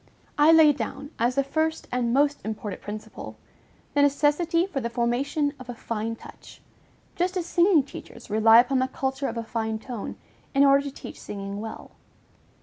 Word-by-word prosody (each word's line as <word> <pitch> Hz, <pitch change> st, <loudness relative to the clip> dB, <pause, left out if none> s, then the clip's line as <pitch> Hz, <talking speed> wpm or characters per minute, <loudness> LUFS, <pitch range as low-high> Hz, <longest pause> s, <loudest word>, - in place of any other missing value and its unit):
I 300 Hz, +2 st, +6 dB
laid 310 Hz, -3 st, +6 dB
down, 285 Hz, 0 st, -5 dB
as 240 Hz, +2 st, +1 dB
the 275 Hz, -, +2 dB
first 315 Hz, +3 st, -1 dB
and 245 Hz, -1 st, 0 dB
most 285 Hz, +3 st, +2 dB
important 210 Hz, -2 st, -5 dB
principle, 210 Hz, +1 st, -8 dB, 0.6 s
the 290 Hz, -, +3 dB
necessity 295 Hz, +4 st, +2 dB
for 335 Hz, -9 st, -4 dB
"the 235 Hz, -, -2 dB
formation 265 Hz, +5 st, 0 dB
of 255 Hz, -1 st, -11 dB
a 245 Hz, -, -5 dB
fine 230 Hz, 0 st, -4 dB
touch," -, -, -14 dB, 0.6 s
just 365 Hz, +2 st, -1 dB
as 350 Hz, -, -2 dB
singing 345 Hz, -3 st, +4 dB
teachers 240 Hz, -3 st, -11 dB
rely 220 Hz, +2 st, +6 dB
upon 255 Hz, +2 st, 0 dB
the 260 Hz, -, +1 dB
culture 265 Hz, +1 st, -3 dB
of 230 Hz, -, -5 dB
a 230 Hz, -, -2 dB
fine 220 Hz, -1 st, -3 dB
tone, 230 Hz, -1 st, -6 dB, 0.4 s
in 275 Hz, +1 st, +6 dB
order 275 Hz, 0 st, +5 dB
to 280 Hz, -, -4 dB
teach -, -, -10 dB
singing 200 Hz, 0 st, -6 dB
well. 220 Hz, 0 st, -8 dB
265 Hz, 175 wpm, -25 LUFS, 230-290 Hz, 0.6 s, I